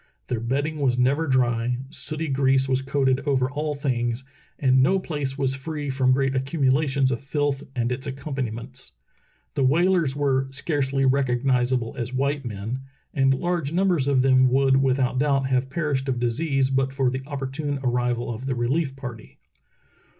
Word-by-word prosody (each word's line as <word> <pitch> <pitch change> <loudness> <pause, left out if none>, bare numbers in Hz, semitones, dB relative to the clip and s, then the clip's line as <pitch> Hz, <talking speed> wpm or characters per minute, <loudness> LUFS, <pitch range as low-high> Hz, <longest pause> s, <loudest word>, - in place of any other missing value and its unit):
Their 125 - -1
bedding 140 +7 -2
was 130 -3 +1
never 140 +6 +2
dry, 120 -2 +1
sooty 155 +4 -2
grease 135 -1 +2
was 130 0 +1
coated 135 -1 +1
over 130 -2 +1
all 150 +1 -2
things, 125 -3 -1 0.3
and 130 -1 +3
no 185 +9 +4
place 145 -7 -3
was 135 -2 0
free 145 +1 -4
from 130 -1 +2
great 135 0 +1
accumulations 135 0 +1
of 120 - -2
filth 145 0 -1
and 120 -1 0
its 130 +3 -4
accompaniments. 130 -3 -5 0.6
The - - 0
whalers 165 +1 +3
were 135 -2 +1
"scarcely 135 -1 -1
rec 135 +1 +2
ognizable 125 -1 +1
as 125 +1 -4
white 140 +2 0
men, 110 +2 -4 0.2
" - - -42
and 135 -3 +3
large 170 -1 -2
numbers 175 -6 +2
of 135 -2 +3
them 130 -1 +5
would 135 +1 +3
without 130 -1 +1
doubt 140 -1 +2
have 130 0 +1
perished 140 -3 -1
of 125 - 0
disease 130 +3 0
but 135 0 +1
for 135 -2 +1
the 130 +1 -3
opportune 140 +1 -3
arrival 120 -1 0
of 125 +4 -7
the 130 - -1
relief 135 +4 0
party. 120 -5 -9
135 Hz, 165 wpm, -24 LUFS, 130-140 Hz, 0.6 s, them